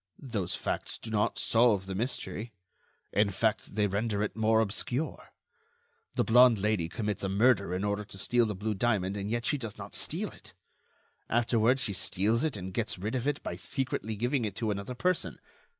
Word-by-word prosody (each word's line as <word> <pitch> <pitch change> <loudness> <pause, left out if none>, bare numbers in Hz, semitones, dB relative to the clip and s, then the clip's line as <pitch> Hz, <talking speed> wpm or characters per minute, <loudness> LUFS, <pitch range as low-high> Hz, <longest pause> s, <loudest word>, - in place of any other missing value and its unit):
"Those 105 -10 -3
facts - - -3
do 110 - -8
not 105 -1 +1
solve 115 -5 +3
the 95 - -4
mystery; 115 +1 -3 0.6
in 105 0 +3
fact, 105 +1 -1
they 105 -1 +3
render 105 +1 0
it 105 - -3
more 110 0 +3
obscure. 120 +7 -2 0.8
The - - +3
blonde 125 0 +6
Lady 100 -5 0
commits 105 0 -3
a 95 - 0
murder 100 -1 +3
in 90 +2 -1
order 105 0 0
to 95 - -10
steal 120 +4 +2
the 105 - -3
blue 105 +3 -2
diamond, 100 -2 +1
and 100 0 -3
yet 120 +1 -1
she 145 - +1
does 115 -5 -5
not - - -8
steal - - -2
it. - - -12 0.7
Afterward 120 +2 +3
she 115 -5 +1
steals 100 +5 +1
it 155 -8 0
and 95 -1 -6
gets 110 -1 -2
rid 105 +5 -3
of 130 +1 -1
it 145 0 -1
by - - -3
secretly 130 -5 -2
giving 120 +4 0
it 105 -3 -3
to 110 -3 -1
another 100 +5 -4
person. 180 +8 0
110 Hz, 190 wpm, -30 LUFS, 100-120 Hz, 0.8 s, blonde